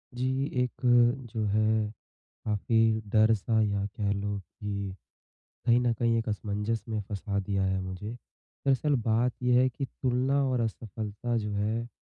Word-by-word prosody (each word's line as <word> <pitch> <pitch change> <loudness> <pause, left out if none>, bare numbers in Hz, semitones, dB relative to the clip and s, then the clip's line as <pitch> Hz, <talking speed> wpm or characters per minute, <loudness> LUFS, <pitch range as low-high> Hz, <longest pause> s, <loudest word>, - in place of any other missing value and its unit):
जी, 130 +2 0 0.2
एक 125 - -2 0.6
जो 110 -2 -1
है 110 +1 +2 0.6
काफ़ी 110 +1 +2
डर-सा, 110 +1 +4
या 100 -2 +1
कह 105 0 -2
लो 100 0 -2
कि 100 0 -5 0.7
कहीं 120 +1 +5
न 120 -1 +2
कहीं 115 0 +1
एक 115 - -2
असमंजस 105 +2 -2
में 110 -1 -1
फँसा 100 -1 -2
दिया 95 0 -1
है 95 0 0
मुझे। 95 +3 -5 0.6
दरअसल 140 +2 +3
बात 120 +3 +3
ये 125 0 +4
है 130 - +4
कि 135 +3 -4
तुलना 130 +2 0
और 125 -2 +1
असफलता 110 +1 -3
जो 105 -1 -3
है, 110 +3 -1
110 Hz, 150 wpm, -29 LUFS, 105-120 Hz, 0.7 s, कहीं